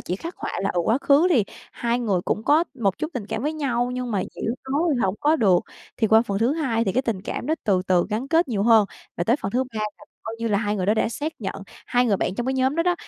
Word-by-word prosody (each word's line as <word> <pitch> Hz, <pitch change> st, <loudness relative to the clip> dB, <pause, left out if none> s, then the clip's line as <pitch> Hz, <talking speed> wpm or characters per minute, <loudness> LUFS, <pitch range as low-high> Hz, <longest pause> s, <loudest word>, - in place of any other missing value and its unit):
chỉ 180 Hz, -, -3 dB
khắc 335 Hz, -, -7 dB
họa -, -, -5 dB
là, 195 Hz, -, +1 dB
ừ, 175 Hz, -, +1 dB
quá 225 Hz, +9 st, +2 dB
khứ 285 Hz, +5 st, +4 dB
thì 235 Hz, -, +4 dB, 0.3 s
hai 235 Hz, +1 st, -1 dB
người 200 Hz, -7 st, 0 dB
cũng 215 Hz, -, -1 dB
có 310 Hz, +4 st, +4 dB
một 200 Hz, -7 st, 0 dB
chút 310 Hz, -, -3 dB
tình 215 Hz, -5 st, -4 dB
cảm 220 Hz, -, -3 dB
với 300 Hz, +2 st, 0 dB
nhau 250 Hz, -5 st, -1 dB
nhưng 250 Hz, -1 st, -3 dB
mà, 195 Hz, -3 st, 0 dB
kiểu, 230 Hz, -, -2 dB, 0.2 s
nói 290 Hz, -, +2 dB, 0.2 s
hổng 190 Hz, +1 st, +1 dB
có 305 Hz, +2 st, +3 dB
được. 190 Hz, -, +4 dB, 0.4 s
Thì 220 Hz, -, +2 dB
qua 220 Hz, +2 st, +5 dB
phần 200 Hz, -4 st, -2 dB
thứ 235 Hz, +5 st, +2 dB
2 260 Hz, -8 st, 0 dB
thì 190 Hz, -, 0 dB
cái 260 Hz, -, +1 dB
tình 210 Hz, -6 st, -2 dB
cảm 235 Hz, -, -4 dB
nó 315 Hz, -, +2 dB
từ 190 Hz, -3 st, +2 dB
từ 180 Hz, -2 st, +3 dB
gắn 235 Hz, +6 st, -2 dB
kết 330 Hz, -1 st, +3 dB
nhiều 210 Hz, -5 st, 0 dB
hơn, 220 Hz, -2 st, +5 dB, 0.3 s
và 175 Hz, -, -1 dB
tới 235 Hz, +4 st, +3 dB
phần 195 Hz, -, -4 dB
thứ 255 Hz, +5 st, +1 dB
3 235 Hz, -4 st, -8 dB
là 210 Hz, -1 st, -5 dB, 0.2 s
coi 225 Hz, -, -5 dB
như 230 Hz, -, -1 dB
là 205 Hz, -2 st, +2 dB
hai 210 Hz, -1 st, -1 dB
người 185 Hz, -1 st, -1 dB
đó 210 Hz, -, +4 dB
đã 220 Hz, -, +1 dB
xác 295 Hz, +7 st, -4 dB
nhận, 195 Hz, -, -3 dB, 0.3 s
hai 245 Hz, 0 st, +2 dB
người 205 Hz, -4 st, +2 dB
bạn 185 Hz, -, -1 dB
trong 240 Hz, +4 st, -3 dB
cái 265 Hz, -, 0 dB
nhóm 265 Hz, +1 st, +1 dB
đó 335 Hz, -, +3 dB
đó, 355 Hz, 0 st, +2 dB
230 Hz, 295 wpm, -23 LUFS, 205-265 Hz, 0.4 s, qua